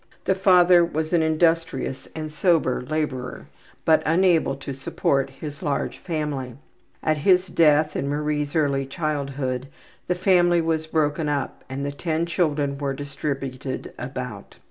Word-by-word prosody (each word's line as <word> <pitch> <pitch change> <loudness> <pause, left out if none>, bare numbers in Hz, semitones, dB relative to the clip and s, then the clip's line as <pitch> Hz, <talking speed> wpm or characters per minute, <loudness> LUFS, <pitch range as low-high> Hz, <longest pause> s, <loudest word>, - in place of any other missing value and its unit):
The - - +3
father 180 -2 +6
was 160 0 -2
an 170 - +4
industrious 160 -4 0
and 155 -1 -5
sober 160 -7 +2
laborer, 130 -2 -3 0.4
but 160 -1 +5
unable 165 -3 +3
to 135 0 -6
support 135 +1 0
his 145 +2 -8
large 145 -2 -2
family. 150 -7 -3 0.5
At 155 0 +2
his 180 +4 +4
death 155 -3 +3
in 140 - -1
Marie's 150 0 -1
early 140 -3 +1
childhood 140 -3 -2 0.4
the 180 - +1
family 175 -2 +4
was 160 -1 0
broken 155 -1 0
up 145 -2 -3
and 135 +1 -4
the 140 - -2
ten 160 +3 -1
children 145 -5 0
were 140 -2 -2
distributed 135 -2 -5
about. - - -6
150 Hz, 140 wpm, -24 LUFS, 140-165 Hz, 0.5 s, father